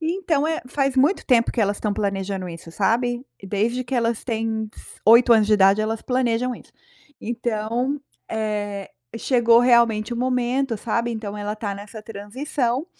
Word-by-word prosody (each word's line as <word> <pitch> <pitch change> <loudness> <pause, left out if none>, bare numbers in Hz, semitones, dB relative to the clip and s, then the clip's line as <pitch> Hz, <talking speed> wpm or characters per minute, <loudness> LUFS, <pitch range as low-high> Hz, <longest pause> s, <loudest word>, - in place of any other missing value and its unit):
e 320 +1 0
então 315 -6 +1
é 320 0 -1
faz 270 0 -1
muito 290 +9 +3
tempo 235 -3 +3
que 235 - -1
elas 205 0 +1
estão 210 -1 -1
planejando 195 -2 -2
isso, 165 -1 -9
sabe, 240 +6 0 0.2
desde 220 +6 -1
que 245 - -4
elas 230 -2 0
têm 225 -2 -2
s - - -13
8 235 +2 +7
anos 220 -2 +5
de 215 - +2
idade, 195 +1 +5
elas 220 +1 -1
planejam 250 -1 0
isso. - - -15 0.5
Então, 235 +4 -2 0.3
eh, 205 -2 -3 0.3
chegou 235 -2 +4
realmente 235 -3 +3
o - - -3
momento, 250 0 0
sabe, 235 +2 -1
então 215 -2 -5
ela 205 0 -3
está 210 -2 -4
nessa 205 +2 -9
transição, 240 +6 -3
230 Hz, 165 wpm, -23 LUFS, 210-250 Hz, 0.5 s, 8